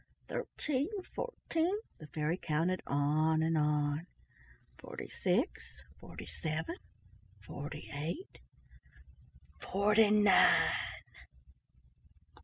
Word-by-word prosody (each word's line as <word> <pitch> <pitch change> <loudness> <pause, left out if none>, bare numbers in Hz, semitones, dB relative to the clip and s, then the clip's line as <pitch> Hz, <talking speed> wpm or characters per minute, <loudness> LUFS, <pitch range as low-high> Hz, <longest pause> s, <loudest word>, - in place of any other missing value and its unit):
"Thirteen—fourteen" 355 - -2 0.2
—the 155 - -10
fairy 150 +3 -1
counted 170 +2 0
on 155 +3 +2
and 165 0 +2
on. 150 +1 +1 0.7
"Forty - - -7
six—forty 70 +1 -3
seven—forty 140 - -7
eight—FORTY 205 - -2
NINE!" 210 -2 +6
160 Hz, 60 wpm, -33 LUFS, 145-210 Hz, 0.7 s, NINE